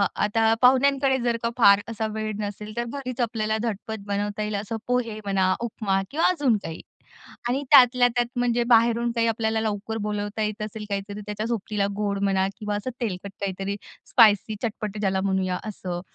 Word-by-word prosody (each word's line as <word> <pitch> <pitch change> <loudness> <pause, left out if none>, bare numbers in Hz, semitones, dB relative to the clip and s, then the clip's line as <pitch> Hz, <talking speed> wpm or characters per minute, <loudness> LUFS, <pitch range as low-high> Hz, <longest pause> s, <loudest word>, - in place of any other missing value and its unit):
आता 225 +1 +2
पाहुण्यांकडे 265 +1 +4
जर 235 -1 +1
का 230 - +1
फार 200 -3 +6
असा 220 -1 -2
वेळ 215 0 -3
नसेल 210 +1 -5
तर 240 - 0
घरीच 255 0 -5
आपल्याला 220 -2 0
झटपट 220 -1 -4
बनवता 205 +1 -2
येईल 210 0 -3
असं 225 +2 -4
पोहे 235 -3 -1
म्हणा, 190 -2 +2
उपमा 195 -4 -1
किंवा 315 +4 +2
अजून 285 -10 +2
काही. 165 0 -6 0.7
आणि 270 +3 0
त्यातल्या 250 -2 +7
त्यात 240 -1 +2
म्हणजे 240 -1 +2
बाहेरून 235 +1 +3
काही 230 0 +2
आपल्याला 220 0 0
लवकर 220 0 -3
बोलावता 205 +1 -3
येत 210 +1 -3
असेल 215 0 -7
काहीतरी 200 +1 -4
त्याच्या 210 +1 -4
सोबतीला 210 -3 -1
गोड 200 -1 -1
म्हणा 190 -1 +2
किंवा 210 -1 -3
असं 205 +5 -3
तेलकट 200 -3 -3
काहीतरी, 195 +1 -3 0.3
स्पाइसी, 215 -2 +5
चटपट 215 -2 -3
ज्याला 190 -2 0
म्हणूया 190 -2 0
असं. 180 -4 -5
215 Hz, 170 wpm, -25 LUFS, 200-235 Hz, 0.7 s, त्यातल्या